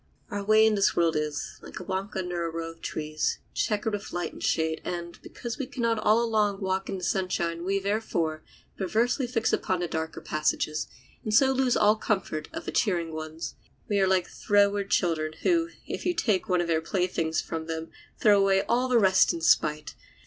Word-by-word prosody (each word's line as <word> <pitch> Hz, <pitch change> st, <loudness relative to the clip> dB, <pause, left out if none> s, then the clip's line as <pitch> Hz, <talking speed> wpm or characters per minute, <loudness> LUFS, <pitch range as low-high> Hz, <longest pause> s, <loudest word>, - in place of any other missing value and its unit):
Our 205 Hz, 0 st, -3 dB
way 215 Hz, +2 st, +5 dB
in 220 Hz, -, +4 dB
this 200 Hz, -1 st, +2 dB
world 170 Hz, -2 st, +2 dB
is, 150 Hz, -1 st, -3 dB
like -, -, -9 dB
a -, -, -7 dB
walk 190 Hz, +3 st, -4 dB
under 180 Hz, -2 st, -2 dB
a 165 Hz, -, -1 dB
row 165 Hz, 0 st, -4 dB
of 165 Hz, 0 st, -18 dB
trees, 155 Hz, 0 st, -2 dB, 0.2 s
checkered 210 Hz, 0 st, 0 dB
with 205 Hz, -1 st, -4 dB
light 175 Hz, 0 st, -3 dB
and -, -, -11 dB
shade, 160 Hz, 0 st, 0 dB
and, 170 Hz, -1 st, -5 dB
because 240 Hz, +3 st, -7 dB
we 270 Hz, -, -3 dB
can 240 Hz, -, -5 dB
not 230 Hz, -1 st, +2 dB
all 215 Hz, +2 st, +3 dB
along 210 Hz, -3 st, +1 dB
walk 190 Hz, 0 st, -2 dB
in 195 Hz, -, -2 dB
the 180 Hz, -, -8 dB
sunshine, 175 Hz, -2 st, -1 dB
we, 195 Hz, +2 st, +1 dB
therefore, 195 Hz, -6 st, -1 dB, 0.4 s
perversely 235 Hz, -, +1 dB
fix 235 Hz, -2 st, 0 dB
upon 185 Hz, -, 0 dB
the 175 Hz, -, -1 dB
darker 160 Hz, 0 st, -4 dB
passages, 155 Hz, 0 st, -1 dB, 0.4 s
and 215 Hz, -1 st, 0 dB
so 265 Hz, +3 st, +6 dB
lose 260 Hz, -2 st, +2 dB
all 210 Hz, +1 st, +5 dB
the 220 Hz, -, -10 dB
comfort 190 Hz, -7 st, -1 dB
of 325 Hz, +1 st, -6 dB
the -, -, -3 dB
cheering 170 Hz, -7 st, 0 dB
ones. 155 Hz, +1 st, -5 dB, 0.3 s
We 205 Hz, -1 st, +1 dB
are 190 Hz, -, +4 dB
like 185 Hz, -2 st, +2 dB
froward 205 Hz, -1 st, +2 dB
children, 155 Hz, -5 st, +1 dB
who, 335 Hz, -2 st, +2 dB, 0.2 s
if -, -, -5 dB
you 355 Hz, 0 st, 0 dB
take 220 Hz, -, 0 dB
one 180 Hz, -1 st, +3 dB
of 175 Hz, -, -2 dB
their 160 Hz, -1 st, +1 dB
playthings 165 Hz, -2 st, -1 dB
from 160 Hz, -1 st, -4 dB
them, 160 Hz, 0 st, -5 dB, 0.3 s
throw 205 Hz, -2 st, +5 dB
away 195 Hz, 0 st, +3 dB
all 250 Hz, +2 st, +2 dB
the 250 Hz, -1 st, +3 dB
rest 190 Hz, -3 st, +5 dB
in 170 Hz, -, -5 dB
spite. 155 Hz, -1 st, +2 dB
190 Hz, 205 wpm, -27 LUFS, 165-215 Hz, 0.4 s, so